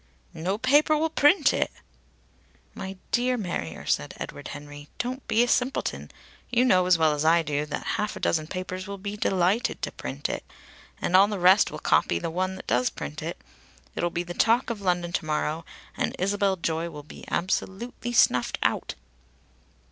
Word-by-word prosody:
"No 185 +5 -2
paper 290 +6 +4
will 320 +1 0
print 305 +5 +4
it!" - - +1 1.0
"My 190 0 -7
dear 250 +1 +2
Marrier," 170 - -4
said - - -1
Edward - - -7
Henry. 145 0 -9
"Don't 255 +2 -4
be 230 +2 +4
a - - 0
simpleton. 250 +2 0 0.4
You 245 +1 +3
know 185 -7 +4
as 180 -2 +5
well 160 -2 +3
as 150 0 -1
I 165 +1 +4
do 150 -1 -2
that 150 - -4 0.2
half 210 - -2
a - - -6
dozen 155 -2 0
papers 185 +2 -5
will 200 0 -5
be 200 +1 -5
delighted 195 +2 +1
to - - -1
print 65 +2 -4
it. - - -4 0.6
And 180 - 0
all 195 +2 +8
the 210 -1 -3
rest 185 +3 +5
will - - -7
copy 85 - +2
the 125 - -3
one 185 +2 -1
that 190 - -10
does 125 +2 +2
print 70 +1 -7
it. - - -5 0.5
It'll 175 - -1
be 170 +1 -2
the 175 0 -7
talk 235 +6 +3
of 215 -3 -5
London 175 -2 0
to 175 - -1
morrow, 155 +1 -1 0.3
and - - -1
Isabel 200 +1 +1
Joy 165 -1 -2
will 150 -3 -9
be 150 - -12
absolutely 195 +6 -2
snuffed 125 - +3
out." - - 0
185 Hz, 185 wpm, -26 LUFS, 160-215 Hz, 1.0 s, all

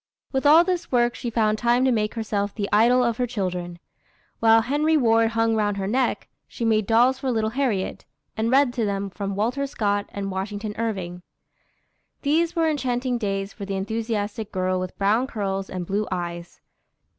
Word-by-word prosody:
With 265 +1 +1
all 320 +3 +8
this 360 -1 -2
work 240 -1 +3
she 240 - -5
found 215 -2 +1
time 240 +2 +3
to 260 - +3
make 215 -2 0
herself 205 -3 -2
the 205 -2 -2
idol 240 +4 +5
of 235 -2 0
her 250 -1 0
children. 180 -6 -3 0.6
While 225 0 +5
Henry 295 +6 +2
Ward 225 -3 +3
hung 225 0 +2
round 205 -2 0
her 195 - -2
neck, 250 +6 0 0.2
she 235 - -5
made 215 -3 +2
dolls 245 +3 +4
for 265 - -2
little 220 -2 0
Harriet, 240 -7 -2 0.3
and 220 +1 0
read 265 -1 +4
to 240 -3 -1
them 200 -1 -2
from 200 0 -4
Walter 245 +7 -1
Scott 205 -6 -1
and 195 -1 -4
Washington 205 +3 -4
Irving. 185 -6 -3 1.0
These 320 +4 +1
were 330 -1 +2
enchanting 250 -4 -1
days 195 -2 -2
for 200 - -7
the 195 0 -3
enthusiastic 215 +1 -3
girl 185 -1 0
with 185 0 -5
brown 215 +6 +2
curls 195 -6 -3
and 180 -1 -4
blue 205 +4 -1
eyes. 175 -1 -5
220 Hz, 180 wpm, -24 LUFS, 200-245 Hz, 1.0 s, all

